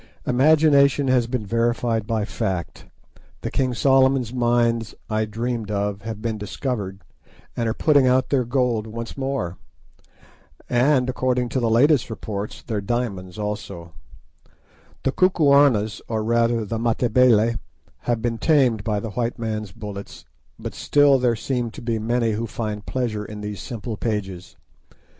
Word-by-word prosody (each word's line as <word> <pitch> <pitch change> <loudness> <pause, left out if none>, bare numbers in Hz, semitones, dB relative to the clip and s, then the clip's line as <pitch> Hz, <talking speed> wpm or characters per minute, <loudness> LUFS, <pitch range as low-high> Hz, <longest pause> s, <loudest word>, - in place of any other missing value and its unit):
Imagination 140 0 +4
has 125 -2 +3
been 120 -3 -3
verified 115 0 0
by 110 -2 0
fact; 95 -6 -4 0.5
the - - -4
King 130 -1 0
Solomon's 130 -2 +3
Mines 120 -2 +1 0.2
I 110 0 +1
dreamed 115 0 -3
of 100 -1 -2
have 110 0 -6
been 110 -2 -2
discovered, 100 -2 -4 0.5
and 115 -1 -1
are 110 - -2
putting 145 -4 +4
out 130 +1 +2
their 135 -3 +2
gold 120 -3 0
once 115 +1 -6
more, 135 -10 -3 1.1
and, 125 +1 +3
according 125 -1 0
to 130 - -1
the 115 -2 +1
latest 130 +4 +4
reports, 105 -2 -5
their 110 -4 -3
diamonds 100 -4 -3
also; 105 -5 -5 1.1
the 135 - +1
Kukuanas 140 - +3
or, 110 -1 -2
rather, 115 0 +1
the 110 +2 -3
Matabele, 115 -1 +3 0.4
have 120 -2 -2
been 115 -1 -1
tamed 130 -8 +3
by 105 -2 0
the 110 +1 -5
white 120 +4 -2
man's 110 -3 -4
bullets, 100 -1 -8 0.3
but - - -6
still 145 -2 +4
there 125 -2 +2
seem 120 +1 -2
to - - -11
be 115 -1 -1
many 115 +1 0
who 110 +2 -2
find 105 -2 -5
pleasure 115 -5 -2
in 105 0 -8
these 105 -1 -5
simple 115 -2 -6
pages. 95 -6 -4
115 Hz, 145 wpm, -23 LUFS, 105-125 Hz, 1.1 s, Imagination